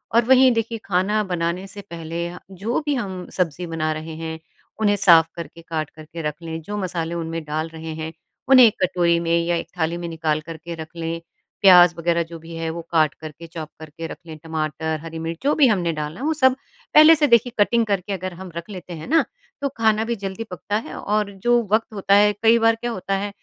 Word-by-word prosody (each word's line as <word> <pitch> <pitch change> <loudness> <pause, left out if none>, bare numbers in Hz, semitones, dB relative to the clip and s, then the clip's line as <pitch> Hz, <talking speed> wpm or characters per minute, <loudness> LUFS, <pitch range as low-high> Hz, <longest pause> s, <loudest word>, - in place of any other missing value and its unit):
और 235 0 +5
वहीं 260 +1 +6
देखिए 230 0 -2
खाना 200 +3 +1
बनाने 170 +2 -1
से 200 +1 -10
पहले 170 +1 -4
ह 175 - -9
जो 200 +6 -2
भी 290 -1 +1
हम 190 -6 -4
सब्ज़ी 175 -1 -1
बना 155 -1 -1
रहे 155 +1 -7
हैं, 160 0 -6 0.4
उन्हें 205 -2 +3
साफ़ 165 -4 +6
करके 165 0 -8
काट 160 -2 -4
करके 160 +1 -10
रख 150 -1 -2
लें। 165 -1 -5
जो 205 +6 -5
मसाले 170 -3 -3
उनमें 165 -1 -4
डाल 155 +2 -3
रहे 160 0 -6
हैं, 160 0 -5 0.4
उन्हें 260 -2 +9
एक 215 - +4
कटोरी 175 -2 +2
में 170 0 +1
या 175 - +1
एक 170 - -3
थाली 160 +2 0
में 175 0 -5
निकाल 160 -2 -1
करके 165 +1 -7
रख 160 +1 -9
लें। 165 0 -4 0.4
प्याज़ 180 -3 +8
वगैरह 170 0 +1
जो 165 0 -10
भी 165 +1 -10
है 165 0 -3
वो 170 +1 -5
काट 155 -3 +3
करके, 160 +1 -10
चॉप 160 -2 -7
करके 160 +1 -8
रख - - -8
लें। 155 -1 -8
टमाटर, 160 0 -3
हरी 165 0 -7
मिर्च 165 0 -4
जो 290 - +3
भी 285 -4 +5
हमने 180 -6 +1
डालना 150 +3 -5
है 275 - -4
वो 320 - +2
सब 260 -4 +4 0.4
पहले 310 +2 +9
से 295 -1 +2
देखिए 235 -1 +4
कटिंग 230 +2 +3
करके 200 -1 -1
अगर 185 -1 -4
हम 185 0 -9
रख 170 +4 -6
लेते 180 -3 -8
हैं 155 -1 -8
ना, 325 +3 +4 0.4
तो 280 - 0
खाना 220 -1 +3
भी 235 +1 -1
जल्दी 195 +2 -5
पकता 205 +3 -4
है - - -8
और 210 -1 -1
जो 240 0 +4
वक़्त 220 0 +1
होता 200 -1 +1
है 210 0 +6
कई 225 +1 +6
बार 225 0 +4
क्या 240 +1 -4
होता 195 -2 -3
है 200 +1 -2
170 Hz, 230 wpm, -22 LUFS, 160-210 Hz, 0.4 s, उन्हें